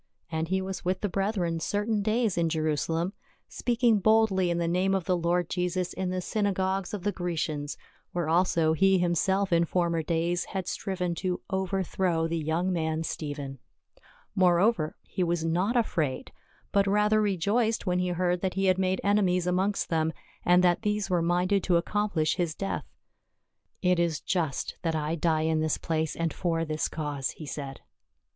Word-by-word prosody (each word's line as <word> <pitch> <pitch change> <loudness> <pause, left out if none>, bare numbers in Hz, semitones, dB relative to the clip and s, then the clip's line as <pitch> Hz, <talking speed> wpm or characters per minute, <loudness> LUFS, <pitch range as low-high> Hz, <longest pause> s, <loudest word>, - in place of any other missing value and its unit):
And 160 0 -1
he 190 +2 0
was 190 -1 -5
with 185 +1 -1
the 205 - 0
brethren 185 -4 -1
certain 210 +5 0
days 220 -1 +1
in 170 -1 +1
Jerusalem, 160 +3 -1 0.3
speaking 235 -3 +2
boldly 205 -3 +3
in 170 - 0
the 170 -1 0
name 185 +3 +2
of 190 - 0
the 185 - +2
Lord 175 0 +1
Jesus 180 0 -1
in 190 -1 -2
the 185 0 -2
synagogues 195 -2 -1
of 205 -4 -5
the 205 - +1
Grecians, 160 -5 -3 0.3
where 175 -3 -2
also 165 -1 +3
he 195 +3 +4
himself 180 +2 +1
in 170 0 +4
former 170 -1 0
days 170 +2 0
had 190 -2 -4
striven 180 -3 -2
to 180 -2 -1
over 190 0 0
throw 170 -2 0
the 165 0 -2
young 165 +4 0
man 160 -1 -1
Stephen. 145 -4 -5 0.7
Moreover, 180 -1 +3
he 185 - -2
was 170 -1 0
not 185 +9 +1
afraid, 160 - -1 0.4
but 200 0 +3
the - - 0
rather 210 +1 +3
rejoiced 210 +4 +1
when 180 -1 +1
he 180 - 0
heard 180 0 0
that 190 -1 -1
he 195 0 +1
had 185 0 +3
made 185 0 +1
enemies 190 -3 +2
amongst 185 +3 0
them, 160 -1 +1 0.3
and 180 +1 +5
that 175 -1 +3
these 210 -2 -1
were 175 -2 +2
minded 180 +3 +2
to 175 -2 +4
accomplish 175 -3 0
his 170 -3 -1
death. 195 - -3 0.5
" - - -48
It 180 -1 +3
is 170 -3 +1
just 160 -7 -2
that 165 -2 -1
I 155 0 -1
die 160 -1 +1
in 160 0 +1
this 155 -1 0
place 160 -1 -2
and 165 -1 -1
for 165 -2 -1
this 155 -1 -1
cause," 145 -5 -3
he 155 - -7
said. 140 -1 -6
180 Hz, 180 wpm, -28 LUFS, 165-195 Hz, 0.7 s, and